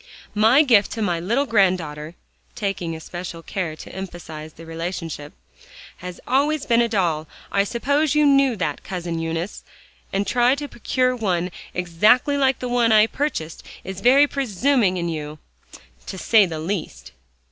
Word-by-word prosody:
"My 225 +8 +5
gift 225 -8 +4
to 225 - -4
my 175 -4 0
little 235 +11 0
granddaughter," 175 - 0 0.4
taking 180 -5 -3
especial 170 +1 -7
care 170 -5 -3
to - - -11
emphasize 165 -5 -8
the 165 - -12
relationship, 165 -2 -5 0.7
"has 180 0 -8
always 290 +3 +1
been 235 -1 +3
a 235 - +1
doll, 170 -7 0 0.2
I 200 - +3
suppose 285 +7 0
you 300 0 +4
knew 275 -3 +4
that, 160 -7 -3
Cousin 175 -3 -4
Eunice; 165 +4 -4 0.5
and 195 +1 0
to 205 - -3
try 245 +2 +4
to 290 +1 -5
procure 255 +1 0
one 180 -6 -1 0.2
exactly 210 - +3
like 270 -2 +2
the 250 - -5
one 240 -2 +2
I 215 -1 +7
have 220 - +2
purchased, 165 - -3 0.2
is 190 0 -7
very 265 +5 +6
presuming 250 -6 +1
in 170 -1 -2
you, 155 -2 -5 0.7
to 190 - -6
say 210 +1 +4
the 160 -2 -5
least." 160 - -5
195 Hz, 160 wpm, -22 LUFS, 170-245 Hz, 0.7 s, I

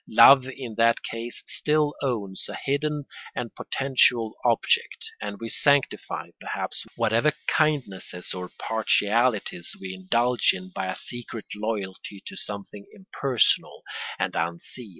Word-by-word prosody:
Love 135 -2 +8
in 130 -3 -7
that 115 0 +4
case 115 +1 -5
still 150 -1 +1
owns 105 -8 -2
a - - -5
hidden 145 +1 0 0.3
and 120 -2 -4
potential 125 -4 +2
object, - - +1
and 100 0 -4
we 115 - -4
sanctify, 140 +4 +1
perhaps, - - -4
whatever 115 +7 +3
kindnesses 125 - 0
or 90 -1 -5
partialities 110 -3 +1
we 95 -1 -6
indulge 120 +7 +2
in 95 0 -8
by 95 - -2
a 95 - -2
secret 120 -2 -7
loyalty 105 -2 -4
to - - -7
something 100 0 -6
impersonal 140 - +1 0.3
and - - -1
unseen. 85 +8 -3
115 Hz, 125 wpm, -26 LUFS, 100-130 Hz, 0.3 s, Love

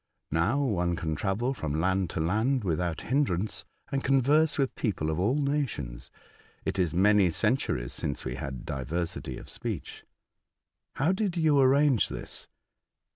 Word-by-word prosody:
Now, 100 - +2
one 90 -9 0
can 80 -2 -2
travel 105 - -1
from 80 - -3
land 95 +1 +1
to - - -4
land 110 +10 +1
without 85 -2 -1
hindrance, 110 -7 0 0.3
and 135 -1 -1
converse 145 +4 +3
with 135 -3 +1
people 85 -8 -1
of 80 - -2
all 105 +9 +2
nations. 140 - -2 0.6
It 95 - -1
is 90 -4 +2
many 100 +2 +4
centuries 85 - 0
since 70 - -3
we 65 - -2
had 65 0 -6
diversity 80 +3 -3
of - - -10
speech.'* - - -5 0.5
" - - -56
How 150 +6 +2
did 190 -2 -1
you 155 -4 +4
arrange 135 -2 +4
this?" - - -7
95 Hz, 150 wpm, -28 LUFS, 80-135 Hz, 0.6 s, many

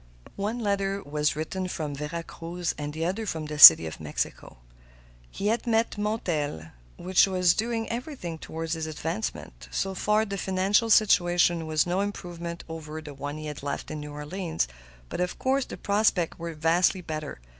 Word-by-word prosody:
One 210 +4 -2
letter 200 -3 -1
was 150 0 0
written 185 +4 -3
from 155 -5 -4
Vera 150 +4 -5
Cruz 170 +1 -4
and 145 0 -5
the 160 +2 -3
other 205 +5 -2
from 160 -4 -3
the 150 -1 -6
City 80 - +12
of 80 - -7
Mexico. 75 -4 -4 0.7
He 195 - -6
had 235 +2 -1
met 225 0 +2
Montel, 165 - -2 0.3
who 185 +2 -7 0.2
was 180 -2 +4
doing 225 0 -2
everything 235 - -5
toward 160 +1 -6
his 160 -1 -2
advancement. 150 - -5
So 195 0 -2
far, 210 +3 +1
the 200 -2 -4
financial 195 +5 +1
situation 175 -5 +4
was 155 -1 +2
no 180 +2 0
improvement 175 -4 -5
over 160 -1 -7
the 150 -2 -9
one 145 +2 -6
he 155 - -7
had 150 -2 -6
left 140 0 -4
in 155 - -5
New 150 0 -7
Orleans, 160 - -3 0.4
but - - -4
of 180 - -2
course 265 0 +1
the - - -8
prospects 200 -5 +1
were 170 -1 -5
vastly 170 +5 +2
better. 155 - -6
170 Hz, 175 wpm, -27 LUFS, 155-200 Hz, 0.7 s, City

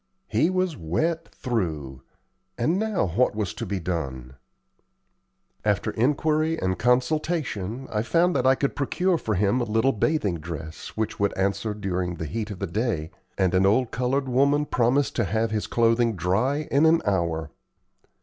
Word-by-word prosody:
He 160 - +2
was 185 -2 0
wet 160 - -1
through; 80 - -3 0.6
and 160 +11 +1
now 215 - 0
what 100 +7 +1
was 105 -1 -2
to 110 +1 -5
be 100 0 -2
done? 70 -8 -4 1.3
After - - +1
inquiry 155 +5 +1
and 95 0 -1
consultation, 130 - 0
I 105 - 0
found 170 +9 +2
that - - +2
I 130 - +6
could 140 +1 -1
procure 175 +5 +1
for 110 - -1
him 105 +6 +2
a - - +1
little 115 +4 +2
bathing 105 - 0
dress 80 +2 -8
which 110 -1 -2
would 100 0 0
answer 100 +2 0
during 90 -3 -2
the 80 - -5
heat 105 +8 -4
of 100 - -6
the 100 - -2
day, 95 -4 -2 0.3
and 95 -2 +2
an 95 +1 +4
old 115 +4 +2
colored 130 +3 0
woman 140 +4 +3
promised 130 +2 +1
to 115 - +3
have 110 +2 0
his 110 -1 -1
clothing 115 -1 +2
dry 110 - 0
in 145 +3 +5
an 165 +1 +4
hour. 85 -5 0
110 Hz, 165 wpm, -25 LUFS, 95-140 Hz, 1.3 s, I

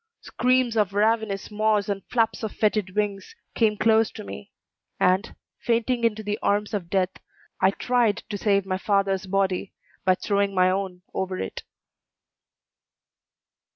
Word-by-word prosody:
Screams 250 -2 +1
of 205 -3 +1
ravenous 215 -1 +1
maws 210 -1 +1
and 200 -2 -3
flaps 225 -2 +1
of 220 -2 -3
fetid 210 -3 0
wings 205 -2 -2 0.2
came 215 -2 +2
close 220 0 +4
to - - -8
me, 100 -8 -9 0.5
and, 185 +5 +2 0.2
fainting 235 +1 0
into 220 -1 +1
the 210 +1 -2
arms 205 +1 0
of 185 -5 -3
death, 185 -1 +1 0.5
I 190 - +6
tried 230 +1 +1
to 210 - -3
save 200 -1 +1
my 185 -1 -2
father's 195 -2 +1
body 195 0 0 0.3
by 185 0 +4
throwing 200 0 0
my 185 0 +4
own 185 -2 -3
over 185 -1 -2
it. 95 - -5
205 Hz, 145 wpm, -25 LUFS, 190-220 Hz, 0.5 s, I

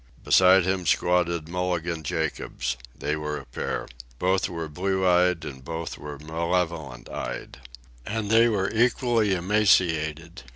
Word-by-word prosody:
Beside 95 0 +6
him 95 -2 -1
squatted 85 -1 +1
Mulligan 90 -1 -2
Jacobs. 75 -5 -2 0.2
They 75 - -1
were 75 -1 -3
a - - -9
pair. - - -4 0.3
Both 95 +4 +1
were 85 -2 -4
blue 95 +4 -1
eyed, 90 -2 +3
and 65 -3 -8
both 80 +4 -5
were 75 -1 -7
malevolent 80 -3 -2
eyed. - - -6 0.4
And 105 - -3
they 115 +1 +6
were 100 -3 0
equally 115 -3 +2
emaciated. 85 -4 +1
85 Hz, 130 wpm, -25 LUFS, 80-95 Hz, 0.4 s, Beside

